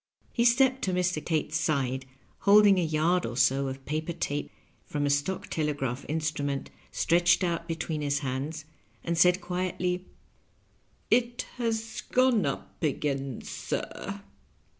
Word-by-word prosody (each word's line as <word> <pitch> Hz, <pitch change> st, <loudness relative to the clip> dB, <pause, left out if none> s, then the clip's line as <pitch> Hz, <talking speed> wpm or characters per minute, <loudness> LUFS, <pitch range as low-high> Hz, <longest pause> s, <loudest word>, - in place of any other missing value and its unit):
He 235 Hz, -, +2 dB
stepped 260 Hz, +2 st, +4 dB
to 185 Hz, -, -1 dB
Mr. 180 Hz, -3 st, 0 dB
Tate's 155 Hz, -1 st, 0 dB
side, 135 Hz, -4 st, 0 dB, 0.3 s
holding 205 Hz, -1 st, +6 dB
a -, -, +2 dB
yard 160 Hz, +3 st, +2 dB
or 120 Hz, +1 st, -4 dB
so 135 Hz, +3 st, +3 dB
of 135 Hz, 0 st, -6 dB
paper 155 Hz, +3 st, -2 dB
tape 145 Hz, -2 st, -3 dB, 0.3 s
from 145 Hz, -1 st, -2 dB
a 145 Hz, -, +2 dB
stock 185 Hz, +8 st, 0 dB
telegraph 140 Hz, -4 st, -2 dB
instrument 155 Hz, -3 st, -2 dB, 0.2 s
stretched 175 Hz, +2 st, +3 dB
out 170 Hz, -1 st, -1 dB
between 160 Hz, -2 st, -3 dB
his 145 Hz, -1 st, +1 dB
hands, 145 Hz, +4 st, -3 dB, 0.4 s
and 170 Hz, -, -1 dB
said 180 Hz, +2 st, +5 dB
quietly, 180 Hz, 0 st, -2 dB, 0.5 s
" -, -, -38 dB, 0.3 s
It 240 Hz, +1 st, +2 dB
has 225 Hz, -2 st, -2 dB
gone 250 Hz, -, +4 dB
up 135 Hz, -, -5 dB
again, 140 Hz, -4 st, -1 dB
sir." -, -, -5 dB
160 Hz, 140 wpm, -28 LUFS, 145-185 Hz, 0.5 s, holding